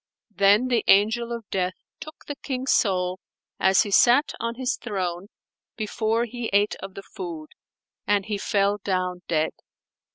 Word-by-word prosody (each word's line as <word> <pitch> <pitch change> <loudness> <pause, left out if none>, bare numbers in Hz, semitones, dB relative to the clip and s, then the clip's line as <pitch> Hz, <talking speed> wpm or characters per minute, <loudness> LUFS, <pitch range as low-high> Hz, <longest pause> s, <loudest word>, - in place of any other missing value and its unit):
Then 205 +5 +4
the 235 -3 +2
Angel 220 +4 +4
of 230 -3 -5
Death 185 -1 -1 0.2
took 310 0 -11
the 290 - -5
King's 260 -2 -3
soul 185 -3 +1 0.4
as 190 +3 +4
he 205 - -6
sat 250 +8 +5
on 230 0 -3
his 255 +1 -1
throne 185 -4 -4 0.5
before 220 +1 0
he 240 0 -5
ate 205 +1 +3
of 195 0 -9
the 195 - -8
food, 165 -6 -7 0.6
and 205 -2 +2
he 210 -2 -3
fell 200 0 +1
down 185 -2 -1
dead. 160 -1 +1
205 Hz, 155 wpm, -24 LUFS, 190-235 Hz, 0.6 s, sat